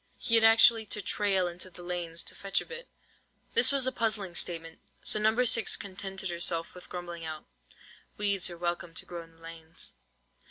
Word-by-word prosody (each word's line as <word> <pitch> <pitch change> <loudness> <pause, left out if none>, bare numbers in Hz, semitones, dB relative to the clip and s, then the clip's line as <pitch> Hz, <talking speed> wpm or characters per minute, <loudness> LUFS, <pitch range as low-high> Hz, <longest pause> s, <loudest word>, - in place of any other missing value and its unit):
He 230 - -4
had 225 -1 +6
actually 225 0 +6
to 210 - -3
"trail" 195 -2 +1
into 175 +2 -5
the 175 0 -13
lanes 175 -2 -3
to - - -7
fetch 195 0 -1
a - - -6
bit. 475 +1 -9 0.7
This 465 - +7
was 275 -2 +3
a 260 - +1
puzzling 215 -6 -1
statement; 165 -2 -1 0.2
so 215 - +1
No. 220 +4 +2
6 230 -1 +5
contented 195 -1 -4
herself 170 -1 -1
with 180 - -13
grumbling 175 -2 -7
out:— 155 -1 -7 0.7
"Weeds 200 -3 +2
are 175 - -8
welcome 175 -1 -4
to - - +2
grow 175 -1 -7
in 165 0 -17
the 165 - -24
lanes." 165 -1 -6
185 Hz, 190 wpm, -29 LUFS, 170-215 Hz, 0.7 s, This